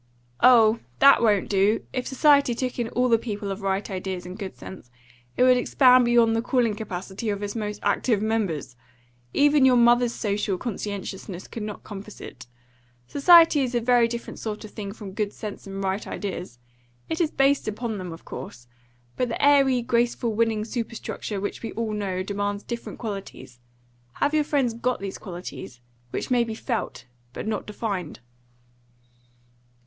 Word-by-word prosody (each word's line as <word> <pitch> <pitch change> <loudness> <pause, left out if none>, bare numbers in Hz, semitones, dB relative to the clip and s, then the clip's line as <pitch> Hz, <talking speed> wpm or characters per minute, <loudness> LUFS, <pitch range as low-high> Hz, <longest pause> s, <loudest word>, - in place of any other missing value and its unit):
"Oh, 230 -3 +6 0.2
that 275 -2 +7
won't 210 -4 +3
do. 200 +2 +2
If 255 -1 -2
society 280 -2 +4
took 255 +1 -3
in 235 -1 -1
all 250 +2 +1
the 230 -2 +4
people 205 -3 -4
of 195 +2 -5
right 195 +1 -1
ideas 185 -1 -4
and 180 +1 -7
good 195 -2 -7
sense, 185 -10 -11 0.5
it - - +4
would 255 0 +6
expand 250 0 +5
beyond 235 -1 +4
the 225 - +1
calling 240 -3 +1
capacity 195 +1 -5
of 205 0 -2
its 205 +1 -4
most 210 -2 -4
active 225 -5 +1
members. 200 - -2 0.6
Even 290 - +4
your 260 -1 +6
mother's 240 0 +4
social 205 -4 -1
conscientiousness 195 -4 -5
could 230 - -7
not 210 -1 -6
compass 205 0 -9
it. 125 -1 -10 0.6
Society 325 - +6
is 250 -2 -1
a - - +3
very 240 0 +4
different 235 0 -6
sort 215 -1 -5
of 210 - -11
thing 200 -3 -6
from 205 -2 -9
good 210 0 -2
sense 210 -2 -8
and 195 0 -5
right 190 +2 -2
ideas. 180 - -5 0.5
It 320 +1 -2
is 325 - +2
based 275 -2 +2
upon 215 0 -3
them, 180 -2 -6
of 165 - -11
course, 120 - -8 0.5
but 250 -1 0
the - - -3
airy, 275 -3 +4
graceful, 235 -1 0
winning 220 -1 +1
superstructure 230 -3 -5
which 205 - -4
we 225 - -5
all 225 -1 -2
know 190 -3 -2
demands 205 +1 -3
different 235 -1 -6
qualities. 195 - -7 0.5
Have 290 - 0
your 305 -1 +2
friends 270 -6 +1
got 240 +2 -1
these 195 -1 -6
qualities, 175 - -8 0.3
which - - -4
may 245 -1 +4
be 225 -1 -5
felt, 230 0 -4 0.3
but - - -6
not 215 0 -3
defined?" 200 -6 -4
220 Hz, 170 wpm, -25 LUFS, 200-245 Hz, 0.6 s, that